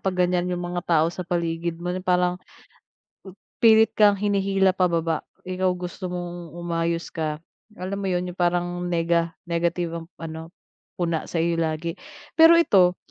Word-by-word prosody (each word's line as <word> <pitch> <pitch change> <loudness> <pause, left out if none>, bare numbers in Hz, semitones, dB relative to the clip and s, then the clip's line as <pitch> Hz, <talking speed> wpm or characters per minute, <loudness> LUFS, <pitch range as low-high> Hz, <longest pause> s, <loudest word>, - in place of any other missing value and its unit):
kapag 185 -2 +1
ganyan 180 0 0
yung 175 0 -3
mga 175 0 -3
tao 160 -2 +4
sa 180 - -6
paligid 170 -1 -2
mo 175 +1 -2
yung 185 +1 -5
parang 180 0 +2 1.2
...pilit 225 -1 +6
kang 205 -2 +5
hinihila 195 -1 +2
pababa. 170 -3 +1 0.2
Ikaw 185 0 -1
gusto 180 +1 -6
mong 175 -2 -6
umayos 170 -1 -2
ka, 155 -2 -2 0.4
alam 190 +2 -4
mo 195 - -2
yun 180 -1 0
yung 175 - -18
parang 175 0 0
nega 170 0 0
negative 170 0 -1
ang 165 - -11
ano, 160 0 -7 0.5
puna 170 -2 -2
sa'yo 165 0 0
lagi. 160 +1 -1 0.5
Pero 330 +1 +9
ito, 185 - +4
175 Hz, 150 wpm, -24 LUFS, 170-185 Hz, 1.2 s, Pero